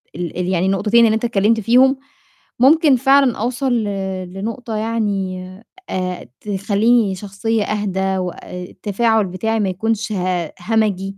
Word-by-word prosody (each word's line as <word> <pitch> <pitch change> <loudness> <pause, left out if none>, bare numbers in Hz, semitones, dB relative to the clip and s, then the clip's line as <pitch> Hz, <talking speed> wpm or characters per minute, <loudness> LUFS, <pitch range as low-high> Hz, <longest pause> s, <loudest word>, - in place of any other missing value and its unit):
ال 175 0 -5
ال 180 - -1
يعني 185 -1 +1
النقطتين 210 +5 +3
اللي 220 -1 +3
أنت 220 - -1
اتكلِّمت 225 0 +2
فيهم، 255 +5 +4 0.6
ممكن 290 +2 +5
فعلًا 270 0 +3
أوصل 250 +3 -1
ل 235 -2 +1 0.5
لنقطة 225 +4 -5
يعني 200 -5 -2 0.4
آآ 180 -4 -3
تخلّيني 205 +1 +1
شخصية 205 +3 -2
أهدى 190 -2 -1
وأ 180 -2 -3 0.3
التفاعل 215 +4 0
بتاعي 220 +5 -2
ما 200 -3 +1
يكونش 220 +4 -2
ه 180 -4 -1
همجي، 195 -1 -1
210 Hz, 135 wpm, -19 LUFS, 190-230 Hz, 0.6 s, ممكن